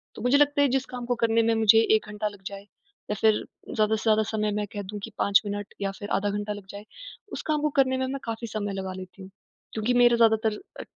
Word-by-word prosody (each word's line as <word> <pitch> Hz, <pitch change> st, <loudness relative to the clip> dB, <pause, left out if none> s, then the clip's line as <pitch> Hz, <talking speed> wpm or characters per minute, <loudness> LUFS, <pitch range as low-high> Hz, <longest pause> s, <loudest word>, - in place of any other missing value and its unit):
तो -, -, -9 dB
मुझे 250 Hz, +4 st, +4 dB
लगता 290 Hz, 0 st, +3 dB
है, 285 Hz, -, +5 dB
जिस 270 Hz, 0 st, 0 dB
काम 245 Hz, -1 st, -5 dB
को 245 Hz, 0 st, 0 dB
करने 230 Hz, 0 st, +4 dB
में 230 Hz, 0 st, +2 dB
मुझे 225 Hz, 0 st, +6 dB, 0.2 s
1 215 Hz, -, 0 dB
घंटा 210 Hz, 0 st, -3 dB
लग 205 Hz, -2 st, -9 dB
जाए, 200 Hz, 0 st, -8 dB, 0.5 s
या -, -, 0 dB
फिर 220 Hz, -1 st, +3 dB, 0.3 s
ज़्यादा 215 Hz, 0 st, +2 dB
से 215 Hz, -, -4 dB
ज़्यादा 220 Hz, -1 st, +3 dB
समय 215 Hz, -1 st, 0 dB
मैं 210 Hz, -, -1 dB
कह 205 Hz, -, -4 dB
दूँ 205 Hz, -, -5 dB
कि 225 Hz, -, -6 dB
5 200 Hz, 0 st, +4 dB
मिनट, 205 Hz, 0 st, -5 dB
या 195 Hz, 0 st, -1 dB
फिर 205 Hz, -, -6 dB
आधा 205 Hz, +1 st, -1 dB
घंटा 205 Hz, +1 st, -3 dB
लग 205 Hz, -2 st, -10 dB
जाए, 205 Hz, +2 st, -9 dB, 0.5 s
उस -, -, -4 dB
काम 305 Hz, -1 st, +1 dB
को 300 Hz, -, +1 dB
करने 260 Hz, -1 st, +3 dB
में 260 Hz, -, 0 dB
मैं 275 Hz, +1 st, -4 dB
काफ़ी 230 Hz, 0 st, -4 dB
समय 205 Hz, -2 st, -3 dB
लगा 190 Hz, -1 st, -4 dB
लेती 185 Hz, +1 st, -12 dB
हूँ। 190 Hz, -, -10 dB, 0.4 s
क्योंकि 220 Hz, +3 st, 0 dB
मेरा 240 Hz, 0 st, +6 dB
ज़्यादातर 220 Hz, -1 st, +3 dB, 0.2 s
अ, -, -, -5 dB
220 Hz, 255 wpm, -26 LUFS, 205-235 Hz, 0.5 s, मुझे